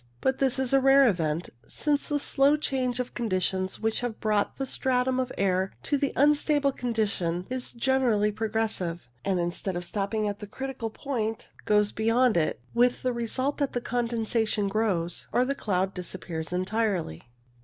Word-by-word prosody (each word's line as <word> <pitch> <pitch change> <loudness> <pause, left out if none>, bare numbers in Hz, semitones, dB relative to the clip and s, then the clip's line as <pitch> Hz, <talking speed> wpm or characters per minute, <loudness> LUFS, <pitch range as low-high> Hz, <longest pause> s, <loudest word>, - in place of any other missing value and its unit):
But 265 - 0
this 270 -1 +2
is 265 -1 0
a 270 - +6
rare 270 0 +6
event, 170 -4 0 0.2
since 295 0 -1
the 295 - +1
slow 285 +1 +3
change 255 -4 -1
of 250 - -3
conditions 185 -4 -1
which 220 0 0
has 245 -2 -2
brought 210 -1 0
the 270 - -2
stratum 255 0 +1
of 255 -1 -1
air 190 0 +1
to 290 - 0
the 280 -1 0
unstable 290 0 +3
condition 200 -9 -1
is 255 -1 -3
generally 235 -4 +2
progressive, 215 - -2 0.2
and 190 -2 0
instead 175 +2 -2
of 175 0 -3
stopping 210 +3 -1
at 205 0 -3
the 210 - -7
critical 265 0 -5
point, 225 -3 -3 0.2
goes 210 0 +3
beyond 230 +1 +2
it, 165 -2 +1
with 245 +1 +2
the 255 -1 +1
result 255 +5 -1
that 285 -2 0
the 245 - 0
con 240 -1 -1
densation 220 -2 0
grows 195 -5 0
or 250 - +3
the 275 - 0
cloud 195 -6 -1
disappears 175 -3 -5
entirely. 185 - -1
225 Hz, 170 wpm, -27 LUFS, 195-260 Hz, 0.2 s, a